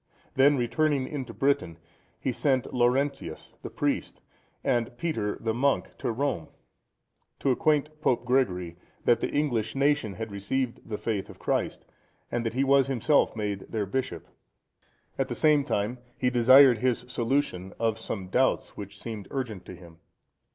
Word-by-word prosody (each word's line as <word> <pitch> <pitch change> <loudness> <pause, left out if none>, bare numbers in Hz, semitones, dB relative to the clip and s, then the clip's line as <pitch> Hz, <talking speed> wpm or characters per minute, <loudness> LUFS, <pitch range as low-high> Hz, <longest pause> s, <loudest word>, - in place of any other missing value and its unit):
Then 140 +2 +5
returning 135 +2 +1
into 135 -5 -5
Britain, 135 - 0 0.4
he 130 - -1
sent 130 0 0
Laurentius 130 +3 0
the - - -6
the - - -26
priest(120) - - -1 0.5
and 120 0 0
Peter 115 -11 -2
the 115 -1 -1
monk(121) 135 +4 0
to - - -1
Rome, 125 - -1 0.9
to 135 - +1
acquaint 150 +3 +1
Pope 125 -4 +1
Gregory, 90 -10 0 0.3
that 120 - +4
the - - -1
English 120 -7 0
nation 140 -6 +2
had 110 -1 -5
received 115 +5 -3
the 105 - -2
faith 105 -4 -2
of - - -11
Christ, - - -2 0.5
and 120 - -1
that 115 0 -3
he 135 - +2
was 140 0 +4
himself 135 +2 +2
made 105 -3 -3
their 105 -2 -1
bishop. 125 -5 -3 0.9
At - - +1
the - - -4
same 150 -2 +4
time, 120 -2 -1 0.2
he 125 -1 +1
desired 125 0 +7
his 125 0 0
solution 115 -7 -1
of 115 -1 0
some 100 -4 -5
doubts - - +1
which 100 0 -8
seemed 110 -4 -6
urgent 115 -9 -4
to 95 - -9
him. 85 -2 -15
120 Hz, 160 wpm, -27 LUFS, 110-135 Hz, 0.9 s, desired